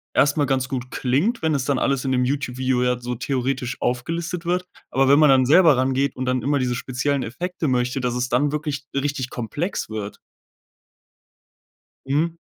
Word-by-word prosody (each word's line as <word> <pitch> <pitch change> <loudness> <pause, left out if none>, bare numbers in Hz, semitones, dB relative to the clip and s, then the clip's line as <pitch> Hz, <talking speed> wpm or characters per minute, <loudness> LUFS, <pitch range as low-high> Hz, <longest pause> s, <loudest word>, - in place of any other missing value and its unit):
erst 145 +2 +3
mal 145 - +3
ganz 130 -1 0
gut 125 -1 -4
klingt, 150 - 0
wenn 155 -2 +2
es 130 - -1
dann 140 -1 +1
alles 135 -1 0
in 130 - 0
dem 125 -1 +2
Youtube-Video 130 -2 0
ja 125 -1 +1
so 125 0 -4
theoretisch 130 0 -2
aufgelistet 165 +7 -2
wird. 180 +1 0 0.3
Aber 135 0 +3
wenn 140 +2 +6
man 150 -2 +6
dann 130 -1 +5
selber 160 0 +6
rangeht 130 +1 +1
und 130 - -3
dann 125 -1 0
immer 145 0 +1
diese 125 -1 0
speziellen 130 +2 -1
Effekte 170 +7 -4
möchte, 125 0 0
dass 125 -1 -1
es 125 0 -1
dann 140 +4 +2
wirklich 150 -2 -3
richtig 140 -2 -1
komplex 145 - -3
wird. 105 -2 -5 1.9
Mhm. 160 +5 0
135 Hz, 180 wpm, -22 LUFS, 125-145 Hz, 1.9 s, wenn